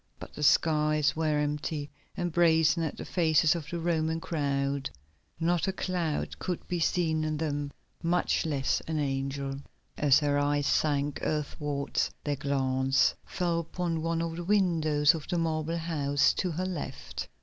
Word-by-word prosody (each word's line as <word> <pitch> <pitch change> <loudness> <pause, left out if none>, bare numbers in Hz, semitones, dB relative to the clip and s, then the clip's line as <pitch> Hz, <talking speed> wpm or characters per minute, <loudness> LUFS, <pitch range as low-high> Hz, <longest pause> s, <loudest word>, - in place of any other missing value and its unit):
But - - -10
the - - -8
skies 150 0 +3
were 155 -2 +1
empty 150 0 -2 0.3
and 175 -1 -1
brazen 160 0 +4
as 160 -3 -2
the - - -7
faces 160 -3 +3
of 165 -4 -5
the 170 - -3
Roman 160 -1 0
crowd; 140 -3 -1 0.5
not 175 +2 +1
a - - +2
cloud 180 -5 -2
could 180 -2 -4
be 175 - -2
seen 160 -2 +1
in 155 -1 -1
them, 145 -2 -2 0.3
much 175 +1 +1
less 140 -4 0
an 160 -1 -1
angel. 135 -1 -2 0.4
As 145 -3 +5
her 145 -1 +1
eyes 145 0 +1
sank 145 -1 +1
earthwards 150 -2 -1
their 145 -1 -1
glance 135 -1 +2
fell 175 -2 0
upon 170 0 -2
one 165 0 0
of 165 0 -4
the 175 - -4
windows 165 -6 +3
of 160 -3 -6
the 175 - -1
marble 165 0 -1
house 145 -4 +1
to 185 - -1
her 175 +3 -2
left. 185 -5 -5
155 Hz, 160 wpm, -29 LUFS, 145-165 Hz, 0.5 s, As